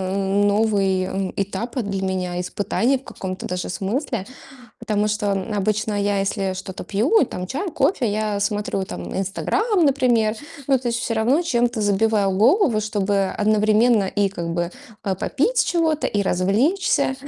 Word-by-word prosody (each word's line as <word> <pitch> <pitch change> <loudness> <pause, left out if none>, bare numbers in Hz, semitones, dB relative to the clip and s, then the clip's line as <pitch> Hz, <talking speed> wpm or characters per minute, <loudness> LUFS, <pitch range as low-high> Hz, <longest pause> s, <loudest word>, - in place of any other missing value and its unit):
новый 195 -1 +1
этап 200 +6 -3
для 195 -2 -3
меня, 180 -1 -2
испытание 205 +8 0
в - - -22
каком-то 185 -1 -6
даже 180 0 -3
смысле. 215 +2 -2 0.5
Потому 210 0 0
что 210 -1 0
обычно 205 +1 -1
я 200 0 +1
если 195 -1 -1
что-то 190 0 -7
пью, 230 - +2
и - - +4
там 180 -5 -6
чай, 300 - -3
кофе, 295 -6 +1
я 210 -1 -1
смотрю 205 -1 -1
там 90 - -6
"Инстаграм", 355 - 0
например, 240 -6 +2 0.3
но 270 -2 +4
то 245 - -8
есть 235 - -1
всё 230 - -2
равно 245 +9 +2
чем-то 240 -6 0
забиваю 205 0 +2
голову, 235 - +3
чтобы 205 -2 0
одновременно 215 +1 +3
и 200 +1 0
как 170 -3 -5
бы, 175 +1 -1 0.3
а, 195 -3 -1
попить 475 - +1
чего-то, 320 -3 +1
и 205 -1 0
развлечься. 260 - +1
210 Hz, 150 wpm, -22 LUFS, 195-240 Hz, 0.5 s, и